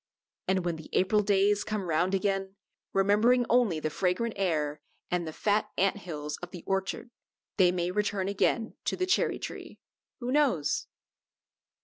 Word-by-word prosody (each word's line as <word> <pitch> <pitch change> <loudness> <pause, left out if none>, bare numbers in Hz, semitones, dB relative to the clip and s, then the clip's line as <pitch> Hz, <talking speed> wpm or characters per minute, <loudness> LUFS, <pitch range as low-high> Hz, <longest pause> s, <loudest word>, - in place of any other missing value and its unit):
And 185 -1 +1
when 170 -2 -1
the 155 - -11
April 210 +3 +3
days 205 0 +3
come 215 -2 -2
round 175 +3 +1
again, 195 0 -1 0.4
remembering 215 +6 +4
only 235 -10 +3
the 155 0 -2
fragrant 190 +7 0
air 155 -6 -1 0.3
and 175 -2 0
the - - -4
fat 210 +6 0
ant 195 +2 +2
hills 150 -6 -5
of 175 - -8
the 175 -2 -9
orchard, 195 +5 -2 0.5
they 180 -3 +5
may 180 0 -1
return 205 -1 0
again 220 +3 0
to - - 0
the 370 - +1
cherry 365 - +2
tree. - - -8 0.4
Who 245 0 -3
knows? 260 - +1
195 Hz, 155 wpm, -29 LUFS, 175-210 Hz, 0.5 s, they